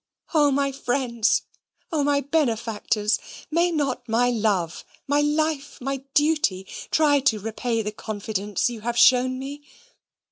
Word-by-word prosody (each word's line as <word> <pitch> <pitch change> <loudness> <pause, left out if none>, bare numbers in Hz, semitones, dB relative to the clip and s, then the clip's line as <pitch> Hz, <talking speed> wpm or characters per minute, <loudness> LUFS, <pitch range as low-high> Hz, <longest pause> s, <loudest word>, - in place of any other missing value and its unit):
O 295 -3 +5
my 275 0 +1
friends! 245 -4 0 0.5
O 305 -3 +1
my 285 0 +2
benefactors! 225 -7 0 0.3
may 340 +3 +3
not 270 -7 -2
my 245 +2 +3
love, 205 -8 0 0.2
my 290 +1 +2
life, 300 -1 0
my 275 +2 -2 0.2
duty, 295 -11 +2 0.2
try 295 -2 +4
to 250 -6 +2
repay 225 +2 -2
the 210 - -3
confidence 210 -2 -2
you 235 -3 -5
have 235 +2 -2
shown 255 +1 +5
me? 280 +2 -7
255 Hz, 135 wpm, -24 LUFS, 225-290 Hz, 0.5 s, O